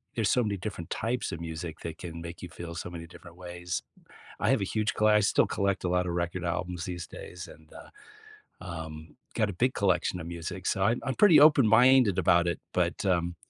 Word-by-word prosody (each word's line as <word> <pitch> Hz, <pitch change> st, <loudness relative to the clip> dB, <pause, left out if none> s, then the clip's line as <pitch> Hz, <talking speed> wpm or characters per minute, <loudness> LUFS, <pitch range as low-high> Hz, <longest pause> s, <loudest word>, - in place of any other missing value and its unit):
there's 110 Hz, -4 st, +1 dB
so 125 Hz, -, +3 dB
many 105 Hz, -2 st, -2 dB
different 95 Hz, -4 st, -6 dB
types 120 Hz, +3 st, -2 dB
of 85 Hz, -, -6 dB
music 80 Hz, -1 st, -6 dB
that 80 Hz, -1 st, -7 dB
can 85 Hz, -1 st, -8 dB
make 85 Hz, 0 st, -8 dB
you -, -, -5 dB
feel 85 Hz, +1 st, -8 dB
so 85 Hz, -, -5 dB
many 85 Hz, -1 st, -8 dB
different 85 Hz, 0 st, -14 dB
ways. 90 Hz, -1 st, -5 dB, 0.6 s
I -, -, +1 dB
have 135 Hz, -5 st, +2 dB
a -, -, +1 dB
huge 110 Hz, +3 st, -1 dB
colle 110 Hz, -, +2 dB
I 105 Hz, 0 st, +5 dB
still 100 Hz, -, +3 dB
collect 100 Hz, -1 st, -1 dB
a -, -, 0 dB
lot 90 Hz, 0 st, +1 dB
of 85 Hz, -, -2 dB
record 85 Hz, +1 st, -2 dB
albums 90 Hz, 0 st, -3 dB
these 90 Hz, -3 st, -5 dB
days 90 Hz, -1 st, -9 dB
and, 80 Hz, 0 st, -16 dB
uh, -, -, -12 dB, 0.7 s
um, 80 Hz, -3 st, -8 dB, 0.2 s
got 105 Hz, -2 st, +1 dB
a -, -, -4 dB
big 125 Hz, +8 st, +1 dB
collection 95 Hz, -2 st, +1 dB
of 80 Hz, -, -7 dB
music, 85 Hz, +2 st, -6 dB
so 95 Hz, -, +1 dB
I'm 110 Hz, +4 st, +2 dB
I'm 135 Hz, -, -2 dB
pretty 205 Hz, -7 st, +7 dB
open-minded 130 Hz, -, +6 dB
about 85 Hz, -1 st, +4 dB
it. 85 Hz, -, -1 dB
But, -, -, 0 dB
um, 85 Hz, -2 st, +1 dB
90 Hz, 220 wpm, -28 LUFS, 85-105 Hz, 0.7 s, pretty